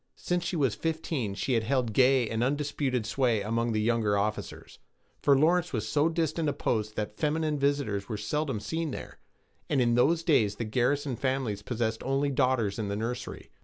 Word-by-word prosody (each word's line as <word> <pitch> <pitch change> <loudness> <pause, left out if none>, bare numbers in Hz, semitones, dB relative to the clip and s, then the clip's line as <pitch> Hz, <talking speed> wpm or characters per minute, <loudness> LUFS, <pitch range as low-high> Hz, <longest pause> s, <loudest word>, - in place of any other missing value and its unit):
Since 180 -1 -1
she 175 - -2
was 135 -8 +2
fifteen 155 -5 -2
she 130 +5 -1
had 115 - +3
held 120 -1 0
gay 130 0 +4
and 110 +2 -1
undisputed 140 -3 -1
sway 120 -3 +1
among 115 +3 -1
the 110 - 0
younger 110 -2 +1
officers; 105 +2 -4 0.4
for 140 -1 +5
Lawrence 175 +4 +2
was 110 -3 -2
so 145 +8 +2
distant 165 -1 0
a - - -1
post 110 -2 -1
that 105 0 -4
feminine 155 -1 0
visitors 140 -8 0
were 110 - -2
seldom 135 +3 -2
seen 160 +7 -3
there, - - -8 0.5
and 140 - +2
in 120 -2 +3
those 155 +8 +3
days 110 - +3
the 115 - -4
garrison 130 +4 0
families 130 -6 -1
possessed 110 -1 -2
only 135 +2 0
daughters 125 -6 +1
in 105 - -2
the 100 - -2
nursery. 115 +3 -5
125 Hz, 185 wpm, -28 LUFS, 110-145 Hz, 0.5 s, for